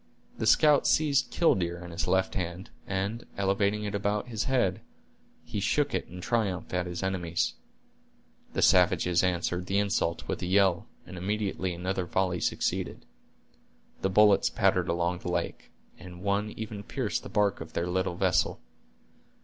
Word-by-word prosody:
The 110 Hz, -, 0 dB
scout 150 Hz, +5 st, +5 dB
seized 140 Hz, -4 st, +3 dB
"killdeer" 90 Hz, -, +1 dB
in 85 Hz, -, -9 dB
his 85 Hz, -1 st, -3 dB
left 95 Hz, 0 st, +1 dB
hand, 90 Hz, 0 st, -4 dB, 0.2 s
and 100 Hz, +4 st, -2 dB
elevating 100 Hz, +2 st, +1 dB
it 105 Hz, 0 st, -3 dB
about 105 Hz, +3 st, -1 dB
his 110 Hz, -2 st, -2 dB
head, 120 Hz, -9 st, +1 dB, 0.6 s
he 105 Hz, -, -4 dB
shook 145 Hz, +8 st, +1 dB
it -, -, -1 dB
in 90 Hz, 0 st, -9 dB
triumph 100 Hz, -5 st, -1 dB
at 90 Hz, 0 st, 0 dB
his 90 Hz, +1 st, -5 dB
enemies. 90 Hz, -3 st, -1 dB, 1.0 s
The -, -, +1 dB
savages 90 Hz, -1 st, +4 dB
answered 90 Hz, 0 st, -1 dB
the 100 Hz, -, 0 dB
insult 100 Hz, -4 st, 0 dB
with -, -, -3 dB
a -, -, -2 dB
yell, 95 Hz, -2 st, +3 dB, 0.2 s
and 90 Hz, 0 st, -8 dB
immediately 95 Hz, -2 st, -2 dB
another 90 Hz, +1 st, -2 dB
volley 90 Hz, -1 st, 0 dB
succeeded. -, -, -2 dB, 1.0 s
The 95 Hz, -, +1 dB
bullets 105 Hz, +1 st, +5 dB
pattered -, -, +1 dB
along 85 Hz, +1 st, 0 dB
the 90 Hz, -, -5 dB
lake, -, -, -3 dB, 0.3 s
and 90 Hz, 0 st, -11 dB
one 100 Hz, +1 st, 0 dB
even 110 Hz, -2 st, -5 dB
pierced 110 Hz, 0 st, -2 dB
the -, -, -9 dB
bark 105 Hz, -3 st, +1 dB
of -, -, -9 dB
their 85 Hz, -, -1 dB
little 90 Hz, 0 st, -1 dB
vessel. 90 Hz, -4 st, +1 dB
95 Hz, 155 wpm, -28 LUFS, 90-105 Hz, 1.0 s, scout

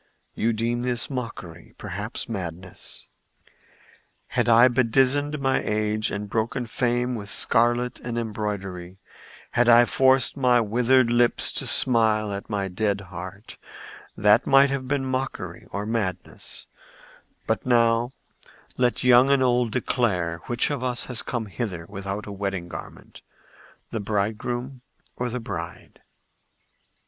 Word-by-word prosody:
"You 115 Hz, -, 0 dB
deem 115 Hz, +2 st, -1 dB
this 125 Hz, +2 st, -1 dB
mockery—perhaps 105 Hz, -3 st, -6 dB
madness. 90 Hz, -4 st, -6 dB, 1.2 s
Had -, -, 0 dB
I 120 Hz, +2 st, +7 dB
bedizened 130 Hz, +4 st, +2 dB
my 135 Hz, -1 st, +1 dB
aged 110 Hz, +1 st, -1 dB
and 105 Hz, 0 st, -4 dB
broken 115 Hz, +4 st, -2 dB
frame 120 Hz, +1 st, -1 dB
with 105 Hz, -4 st, -6 dB
scarlet 120 Hz, +3 st, +1 dB
and 120 Hz, -1 st, -5 dB
embroidery, 100 Hz, -5 st, -4 dB, 0.5 s
had 120 Hz, 0 st, +3 dB
I 120 Hz, +1 st, +7 dB
forced 130 Hz, 0 st, +3 dB
my 125 Hz, -3 st, +3 dB
withered 120 Hz, +2 st, +2 dB
lips 120 Hz, 0 st, +3 dB
to -, -, -1 dB
smile 110 Hz, -4 st, +3 dB
at 100 Hz, +1 st, -7 dB
my 100 Hz, -2 st, -1 dB
dead 100 Hz, +2 st, -1 dB
heart, 95 Hz, +4 st, -9 dB, 0.6 s
that 105 Hz, 0 st, +4 dB
might 135 Hz, 0 st, +5 dB
have 135 Hz, -2 st, -3 dB
been 140 Hz, 0 st, -1 dB
mockery 130 Hz, +1 st, -4 dB
or 100 Hz, +1 st, -4 dB
madness; 105 Hz, -5 st, -3 dB, 0.8 s
but -, -, -1 dB
now 120 Hz, -1 st, +3 dB, 0.7 s
let 125 Hz, -1 st, +1 dB
young 125 Hz, +1 st, +6 dB
and 140 Hz, -1 st, +4 dB
old 125 Hz, -1 st, +2 dB
declare 95 Hz, -9 st, -1 dB
which 120 Hz, +4 st, 0 dB
of 140 Hz, -3 st, -3 dB
us 125 Hz, -1 st, +1 dB
has 125 Hz, -3 st, +2 dB
come 120 Hz, -3 st, -3 dB
hither 100 Hz, -5 st, -5 dB
without 100 Hz, 0 st, -5 dB
a 105 Hz, -, -7 dB
wedding 100 Hz, -3 st, -4 dB
garment—the 110 Hz, -, -11 dB
bridegroom 110 Hz, +5 st, -3 dB, 0.3 s
or 125 Hz, 0 st, -3 dB
the 125 Hz, +2 st, -3 dB
bride." 115 Hz, -, -7 dB
115 Hz, 125 wpm, -24 LUFS, 105-125 Hz, 1.2 s, I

